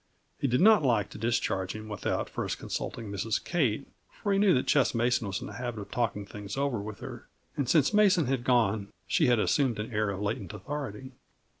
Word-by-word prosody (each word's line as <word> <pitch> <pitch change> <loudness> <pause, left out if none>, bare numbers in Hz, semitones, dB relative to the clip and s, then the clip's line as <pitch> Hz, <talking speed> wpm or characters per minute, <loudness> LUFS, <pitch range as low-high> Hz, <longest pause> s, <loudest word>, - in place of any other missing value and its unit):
He - - +1
did 125 +4 +2
not 215 -1 +7
like 115 -7 +1
to - - -9
discharge 100 -5 0
him 110 0 -7
without 105 -1 -2
first - - -3
consulting 110 -3 -5
Mrs. 105 +3 -1
Kate, 140 -7 0 0.2
for 205 - -2
he 195 - +3
knew 200 -2 +5
that 125 - +1
Ches 140 -4 +3
Mason 120 -1 +1
was 100 +3 -2
in - - -5
the - - -8
habit 120 -3 -4
of 100 - -9
talking 110 -4 -1
things 105 +3 -7
over 140 -5 0
with 105 0 -7
her, - - -8 0.3
and 135 -4 -1
since 150 +4 +4
Mason 200 -8 +4
was 135 0 +1
gone, 110 -5 +2 0.2
she 155 - +2
had 120 -1 +4
assumed 130 +2 +2
an 105 +3 -5
air 105 -1 +1
of 100 -1 -3
latent 105 -2 -3
authority. 130 +2 -6
120 Hz, 210 wpm, -29 LUFS, 105-140 Hz, 0.3 s, not